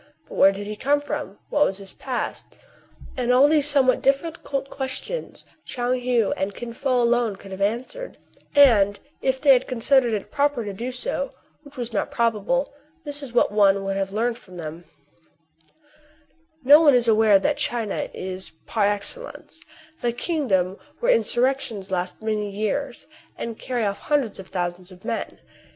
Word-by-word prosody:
But - - -12
where 195 - +6
did 200 +1 -6
he 210 +1 -5
come 285 +6 +1
from 290 -7 -5
} - - -42
What 295 - +4
was 195 -9 0
his 195 -1 -7
past 255 -2 -4 0.4
} - - -18
All 250 +3 +5
these 295 -1 +4
somewhat 270 -3 +4
difficult 275 -1 -1
ques 265 -1 -3
tions - - -6 0.2
Tchoung 250 0 -2
Heou 240 -4 +2
and 195 +1 -3
Kin 240 -1 -7
Fo 255 -1 +1
alone 235 -3 +2
could 195 0 -13
have 190 +1 -7
answered; 250 - -3 0.4
and 210 -8 +5 0.2
if 265 0 0
they 275 0 +6
had 255 0 +1
considered 250 0 +2
it 205 -2 -4
proper 285 -5 0
to 200 - -4
do 235 +6 -4
so, - - -2 0.3
which 290 -2 -16
was 240 -2 -4
not 200 - -1
probable, 235 +4 0 0.3
this 290 -1 -4
is 275 -4 -7
what 240 - +3
one 200 -2 +4
would 195 0 -2
have 195 0 -2
learned 230 +3 -1
from 180 -1 -14
them: 165 +1 -7 0.9
— 310 +1 -34
No 290 +4 +8
one 290 -5 +6
is 240 -1 +3
unaware 220 -2 +5
that 290 +9 0
China, 230 -4 -1
is, 185 -1 -6 0.2
par 210 -3 +1
excellencey 205 - -5 0.4
the 240 -2 +1
kingdom 225 - -1 0.2
where - - +4
insurrections 240 - +1
last 185 +3 -3
many 215 -1 -1
years, 215 +6 -3 0.3
and 230 -1 -5
carry 245 -3 -2
off 200 0 -2
hundreds 275 -9 -1
of 190 - -9
thousands 180 0 -4
of 185 0 -15
men. - - -3
240 Hz, 175 wpm, -23 LUFS, 200-285 Hz, 0.9 s, No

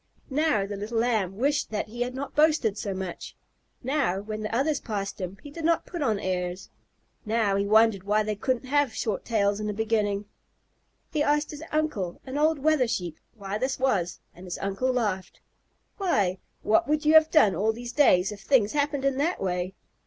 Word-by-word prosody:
Now 295 -8 +2
the 205 +1 -5
little 215 +3 -4
Lamb 220 -5 0
wished 285 +5 +1
that 215 0 -3
he 240 +2 -7
had 250 +1 -2
not 280 +1 -5
boasted 300 -9 +3
so 205 -1 -4
much. 190 -2 -6 0.5
Now, 260 -8 0
when 215 +1 -5
the 215 +1 -3
others 285 +3 +1
passed 200 -2 -4
him, 185 +1 -5
he 290 - -10
did 330 +2 -7
not 335 +1 +2
put 345 -3 -6
on 220 -7 +1
airs. 180 0 -3 0.5
Now 215 -2 +1
he 200 0 0
wondered 220 -1 +4
why 210 +3 +1
they 210 0 -2
couldn't 255 +4 -1
have 280 -3 +1
short 215 -4 -2
tails 205 -3 +1
in 210 - -3
the 210 - -2
beginning. 210 -2 0 0.9
He 305 - +1
asked 295 +1 +1
his 300 -1 -8
uncle, 305 - -1
an 260 0 -6
old 310 +2 +3
Wether 295 -3 +2
Sheep, 175 -7 -3 0.2
why 200 -1 -4
this 260 +2 -1
was 195 -10 0
and 180 - -12
his 180 - -4
uncle 195 +7 -1
laughed. 210 -7 -2 0.6
"Why, 200 - +1 0.2
what 220 - +3
would 300 0 0
you 305 - +5
have 315 0 +7
done 220 - +5
all 210 +6 +1
these 240 +2 -7
days 195 -10 +4
if 205 -1 -9
things 220 -1 +3
happened 285 -1 0
in 275 -1 +1
that 325 +6 0
way? 180 0 -2
220 Hz, 195 wpm, -26 LUFS, 200-285 Hz, 0.9 s, have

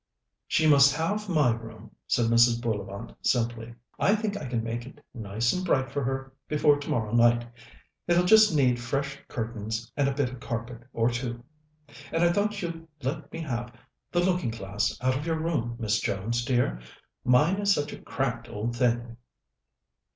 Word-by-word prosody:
"She 155 - +2
must 140 -2 +6
have 200 +6 -2
my 150 -8 +3
room," 115 -1 -10 0.2
said 120 - +2
Mrs. 115 +1 +4
Bullivant 105 -2 -4
simply. 115 -1 -1 0.2
"I 200 - +4
think 215 -1 -2
I 150 -9 -5
can 120 -2 -2
make 115 +1 -3
it - - -15
nice 110 +1 -1
and 185 - -2
bright 135 -7 +1
for 140 0 -2
her 135 +1 -3
before 150 -1 +3
tomorrow 115 -6 -2
night. 120 0 +4 0.6
It'll 175 +1 +4
just 215 +2 +7
need 125 -4 +3
fresh 140 +3 -3
curtains 115 0 -4
and 145 -1 +2
a - - -1
bit 135 -3 0
of 125 - -9
carpet 120 -1 -6
or 115 0 +1
two, 120 0 -4 0.7
and 165 - +1
I 170 - +5
thought 205 +1 0
you'd 165 -1 -5 0.2
let 145 +2 -3
me 165 - -5
have 120 -5 -4 0.4
the 175 - +2
looking 180 -7 +1
glass 105 -1 -2
out 130 +1 +2
of 145 +5 -4
your 160 -1 0
room, 145 -8 -1
Miss 110 -2 0
Jones 115 +5 -1
dear. 120 - +1 0.4
Mine 150 +10 +4
is 205 0 +2
such 145 -6 0
a - - -10
cracked - - -3
old 115 +3 -3
thing." 120 -1 0
125 Hz, 175 wpm, -27 LUFS, 115-155 Hz, 0.7 s, just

